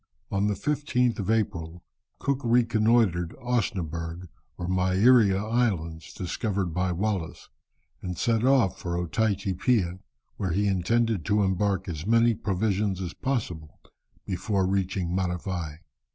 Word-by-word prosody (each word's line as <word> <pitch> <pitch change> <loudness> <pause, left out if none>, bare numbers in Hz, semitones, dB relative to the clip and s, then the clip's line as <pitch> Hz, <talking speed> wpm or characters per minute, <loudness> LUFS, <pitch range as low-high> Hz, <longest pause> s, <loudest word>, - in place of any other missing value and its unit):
On 100 +1 +1
the 105 - 0
15th 125 -2 0
of 100 - -3
April, 90 -6 -1 0.3
Cook 140 -1 -1
reconnoitred 115 -6 +2
Osnaburgh 90 -8 -2 0.3
or 90 - -4
Mairea 95 +3 +4
Islands, 95 -7 -1
discovered 95 -1 -2
by 90 +1 0
Wallis, 95 -2 -3 0.5
and 90 -2 -5
set 115 -2 +1
off 130 -8 +3
for 85 -1 -3
Otaiti 100 +3 0
Piha, 95 -4 +1 0.4
where 95 -4 -1
he 100 +3 +1
intended 105 +1 +1
to 105 0 +2
embark 95 0 0
as 85 0 -5
many 115 +1 +4
provisions 100 -1 -1
as 90 -1 -4
possible 90 - -3 0.5
before 95 +1 0
reaching 95 -2 -1
Matavai. 90 -3 -3
95 Hz, 125 wpm, -27 LUFS, 90-110 Hz, 0.5 s, Mairea